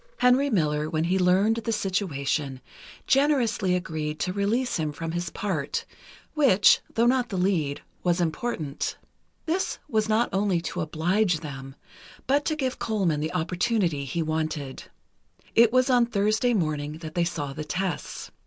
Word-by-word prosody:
Henry 255 +3 +4
Miller, 150 - +1
when 155 0 0
he 185 +3 +1
learned 190 +5 +3
the 230 0 -2
situation, 155 -10 -1 0.5
generously 255 -10 +2
agreed 155 -4 -3
to 180 - -1
release 220 +6 0
him 155 -2 -1
from 165 +2 -5
his 175 +1 -3
part, 170 -9 -3 0.5
which, 265 -10 +5 0.2
though 230 - +3
not 250 0 +2
the 195 - -3
lead, 175 -7 0 0.2
was 175 0 +1
important. 160 -3 -2 0.5
This 345 +4 -1
was 220 -1 0
not 225 +3 +3
only 195 -2 +2
to 180 +1 -4
oblige 170 +3 +1
them, 135 -3 -8 0.5
but 285 +3 +2
to 310 - 0
give 260 -4 -2
Colman 190 -9 0
the 155 +4 -3
opportunity 180 -2 0
he 160 +5 -2
wanted. 155 -3 -3 0.7
It 230 -1 +6
was 255 +1 +3
on 245 -3 +4
Thursday 220 +3 +1
morning 150 -5 -1
that 155 0 -8
they 175 - +1
saw 145 -5 -3
the 155 - -5
tests. 180 +1 -4
180 Hz, 155 wpm, -26 LUFS, 155-225 Hz, 0.7 s, It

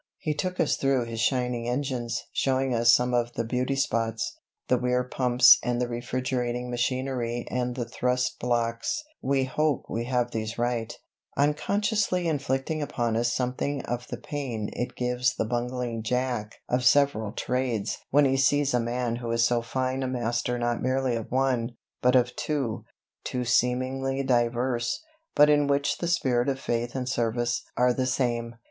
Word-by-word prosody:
He 155 - -2
took 185 +4 -3
us - - +2
through 135 -3 +1
his 115 -1 -5
shining 125 -1 0
engines, 125 -2 -2
showing 135 -1 +1
us 120 0 +5
some 125 +1 +3
of 120 0 +1
the 115 - -1
beauty 125 +3 -1
spots 115 -5 -1 0.3
the 125 - +3
Weir 125 0 +1
pumps 125 -1 +6
and 120 -1 -1
the 125 - 0
refrigerating 125 0 -2
machinery 120 -1 -1
and 125 -1 -1
the 120 -3 -2
thrust 125 +1 -1
blocks 120 - -1 0.2
(we 135 0 +1
hope 150 +1 0
we 115 +1 -3
have 125 -1 0
these 110 0 -3
right), 120 -1 -1 0.5
unconsciously 185 +5 +1
inflicting 140 0 -1
upon 120 -5 -1
us 120 +1 +1
something 130 +3 -2
of 120 +1 -4
the - - -5
pain 125 -8 -4
it 125 +1 -4
gives 125 0 0
the - - -1
bungling 120 0 -2
jack 120 -2 -2
of 125 +1 0
several 120 -5 +3
trades 125 -2 -2
when 145 +1 +5
he 135 0 +2
sees 140 +1 +3
a 125 - +3
man 120 0 -1
who 120 -1 -5
is 115 0 +3
so 120 0 +2
fine 130 +2 -2
a 130 - -1
master 120 -1 -1
not 120 0 -1
merely 130 -1 +1
of 115 -2 -5
one, 125 -2 0 0.2
but 125 +1 +4
of 125 -1 +3
two 135 -8 -2 0.4
two 125 -1 -2
seemingly 130 +3 +1
diverse, 120 - 0 0.3
but 150 - +7
in 145 -1 +4
which 140 0 +1
the 170 - -2
spirit 130 -7 +1
of 135 -1 -1
faith 120 -1 -2
and 130 -1 -2
service 120 0 0 0.2
are 125 0 +4
the 130 +1 -1
same. 120 -2 -1
125 Hz, 165 wpm, -27 LUFS, 120-135 Hz, 0.5 s, but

